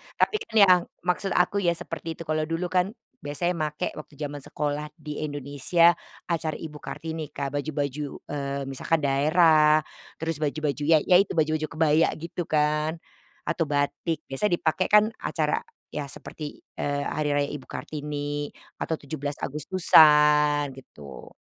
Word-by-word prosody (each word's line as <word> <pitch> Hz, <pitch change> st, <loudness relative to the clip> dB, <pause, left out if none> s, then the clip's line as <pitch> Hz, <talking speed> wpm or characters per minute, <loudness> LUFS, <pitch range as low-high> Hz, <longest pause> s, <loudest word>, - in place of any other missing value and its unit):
tapi 430 Hz, -, +2 dB
kan 225 Hz, -, -10 dB
yang 185 Hz, -4 st, +7 dB, 0.2 s
maksud 180 Hz, +1 st, 0 dB
aku 180 Hz, +3 st, +2 dB
ya 175 Hz, -3 st, +2 dB
seperti 165 Hz, 0 st, -5 dB
itu 165 Hz, -, -8 dB
kalau 155 Hz, 0 st, -1 dB
dulu 165 Hz, +2 st, -2 dB
kan, 185 Hz, +3 st, +1 dB, 0.3 s
biasanya 150 Hz, +5 st, -1 dB
make 155 Hz, +3 st, -2 dB
waktu 150 Hz, -, -12 dB
zaman 145 Hz, 0 st, -5 dB
sekolah 150 Hz, +2 st, -3 dB
di 150 Hz, -2 st, -7 dB
Indonesia, 145 Hz, +4 st, +3 dB, 0.4 s
acara 160 Hz, -2 st, -1 dB
Ibu 150 Hz, -2 st, -8 dB
Kartini, 160 Hz, -2 st, -6 dB
Kak 140 Hz, -1 st, -3 dB
baju-baju, 145 Hz, -1 st, -3 dB, 0.3 s
eee, 140 Hz, -1 st, -3 dB
misalkan 150 Hz, +4 st, 0 dB
daerah, 155 Hz, +2 st, +4 dB, 0.3 s
terus 165 Hz, -2 st, -3 dB
baju-baju 150 Hz, -1 st, -1 dB
ya 160 Hz, -, +7 dB
ya 180 Hz, -, +6 dB
itu 195 Hz, -, +1 dB
baju-baju 155 Hz, 0 st, +1 dB
kebaya 160 Hz, 0 st, +3 dB
gitu 170 Hz, +1 st, -5 dB
kan. 150 Hz, +1 st, +1 dB, 0.5 s
Atau 165 Hz, -1 st, -1 dB
batik 145 Hz, +2 st, -1 dB
biasa 135 Hz, +10 st, -1 dB
dipakai 175 Hz, 0 st, +1 dB
kan 210 Hz, +1 st, +5 dB
acara -, -, 0 dB, 0.3 s
ya 150 Hz, -1 st, -3 dB
seperti, 150 Hz, +2 st, -8 dB, 0.2 s
eee, 145 Hz, 0 st, -1 dB
hari 150 Hz, 0 st, -2 dB
raya 145 Hz, 0 st, +1 dB
Ibu 145 Hz, -3 st, -8 dB
Kartini, 145 Hz, -1 st, -4 dB, 0.3 s
atau 160 Hz, -, -1 dB
17 145 Hz, -1 st, -5 dB
Agustusan, 150 Hz, -1 st, +5 dB
gitu. 70 Hz, -, -12 dB
150 Hz, 145 wpm, -26 LUFS, 145-165 Hz, 0.5 s, yang